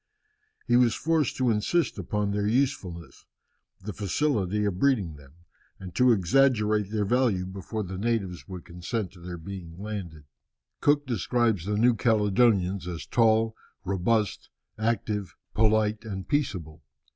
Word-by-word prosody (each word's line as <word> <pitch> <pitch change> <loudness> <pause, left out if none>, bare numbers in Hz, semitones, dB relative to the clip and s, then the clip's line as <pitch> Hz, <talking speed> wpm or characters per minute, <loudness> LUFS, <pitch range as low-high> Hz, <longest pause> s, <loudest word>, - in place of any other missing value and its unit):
He 120 - +2
was 120 -2 +4
forced 160 -1 +1
to 125 -2 +2
insist 115 +11 0
upon 105 -2 -1
their 105 0 0
usefulness, 100 - -2 0.5
the 105 +2 -6
facility 105 - 0
of 95 -3 -2
breeding 115 - +2
them, 70 -1 -16 0.5
and 90 -2 -9
to 125 +6 +4
exaggerate 105 0 +3
their 105 -1 -1
value 115 -5 +1
before 95 +3 -5
the 95 0 -6
natives 100 -5 -2
would 90 -3 -8
consent 90 +3 -4
to 90 - -16
their 90 0 -7
being 85 -1 -8
landed. 95 -7 -6 0.6
Cook 145 0 +3
describes 115 -4 0
the 105 +1 -1
New 120 +3 +5
Caledonians 105 -4 +2
as 85 -2 -5
tall, 115 -1 +3 0.3
robust, 100 +3 0 0.3
active, 110 -3 -1 0.2
polite, 110 0 +2
and 95 -4 -6
peaceable. 85 - -2
105 Hz, 135 wpm, -27 LUFS, 95-115 Hz, 0.6 s, New